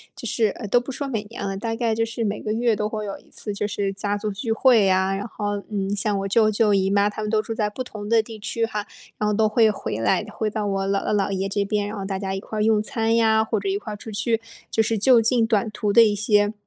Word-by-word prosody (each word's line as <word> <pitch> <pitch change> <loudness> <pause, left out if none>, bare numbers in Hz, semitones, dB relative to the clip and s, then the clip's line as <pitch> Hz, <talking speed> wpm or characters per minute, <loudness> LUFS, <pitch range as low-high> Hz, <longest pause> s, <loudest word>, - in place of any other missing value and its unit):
就 - - -9
是 225 -2 +2
呃， 210 - -7
都 245 - +5
不 250 - -9
说 280 +2 -3
每 220 -4 -2
年 205 -1 -7
了， 195 0 -3
大 225 +2 -3
概 230 -1 0
就 225 +1 +1
是 230 0 -4
每 210 0 -1
个 215 - -2
月 230 -1 +1
都 210 +1 -1
会 215 -1 -4
有 200 - -5
一 - - -24
次 210 - -6
就 205 +1 -2
是 200 -1 -2
家 200 +1 -2
族 210 0 -3
聚 225 +3 -2
会 225 -5 +5
啊， 190 +1 +2
然 200 +3 -3
后， 205 -2 -3
嗯， 200 -1 -2
像 205 0 0
我 195 - -2
舅 215 +1 +4
舅 215 0 +2
姨 195 -1 +2
妈 200 +1 +3
他 210 - -6
们 215 - -2
都 215 -1 +2
住 225 +1 -5
在 210 -2 0
不 255 +5 -5
同 210 -4 -8
的 225 +1 +4
地 220 -1 -10
区 230 +2 -1
哈， 210 -2 -4 0.3
然 210 - 0
后 - - +1
都 215 +1 +2
会 220 0 +4
回 195 - -3
来， 115 - +1
回 215 0 -2
到 210 0 -3
我 195 -1 -1
姥 195 0 0
姥、 - - 0
姥 200 -2 +1
爷 195 0 -1
这 200 0 0
边， 205 0 -1
然 215 - -6
后 195 - -4
大 195 -1 -3
家 190 -1 -3
一 195 - -2
块 215 +1 -4
用 215 -1 +3
餐 225 +1 -1
呀， 220 -1 +4
或 220 -1 -1
者 195 - -5
一 195 - +1
块 210 +1 -7
出 220 - -9
去， 225 +2 0 0.3
就 220 - +2
是 220 +1 0
就 235 +3 +5
近 230 0 +3
短 220 -1 +1
途 210 -1 -1
的 235 - +8
一 210 -2 +2
些， 205 0 +2
210 Hz, 315 characters per minute, -23 LUFS, 200-225 Hz, 0.3 s, 的